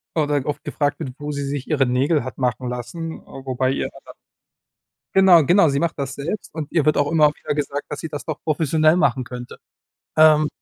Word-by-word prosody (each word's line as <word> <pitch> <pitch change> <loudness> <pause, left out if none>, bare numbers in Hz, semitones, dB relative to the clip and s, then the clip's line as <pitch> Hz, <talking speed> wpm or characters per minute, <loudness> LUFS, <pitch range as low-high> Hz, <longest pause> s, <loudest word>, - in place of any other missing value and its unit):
oder 145 -3 0
oft 150 - -4
gefragt 145 -2 -1
wird, 130 - -5
wo 145 0 -5
sie 140 -1 -3
sich 140 -1 -4
ihre 145 -4 +2
Nägel 135 +4 +1
hat 130 - -7
machen 125 -1 -1
lassen, 160 +7 -6
äh, - - -26 0.2
wobei 130 0 0
ihr 135 - -2
da - - -17
dann - - -12 1.0
Genau, 185 -4 +7
genau, 175 +5 +5
sie 140 0 0
macht 165 -2 -2
das 135 -1 -3
selbst 165 +9 -5
und 155 -2 -5
ihr 165 -4 +1
wird 155 - +3
auch 145 0 +1
immer 155 -2 +5
wieder - - -4
gesagt, 145 -1 -3
dass 150 - -5
sie - - -5
das 150 -2 -6
doch 155 -2 -5
professionell 155 +1 +2
machen 135 -7 +1
könnte, 125 0 -8 0.6
ähm 155 -1 +6
145 Hz, 215 wpm, -21 LUFS, 135-155 Hz, 1.0 s, Genau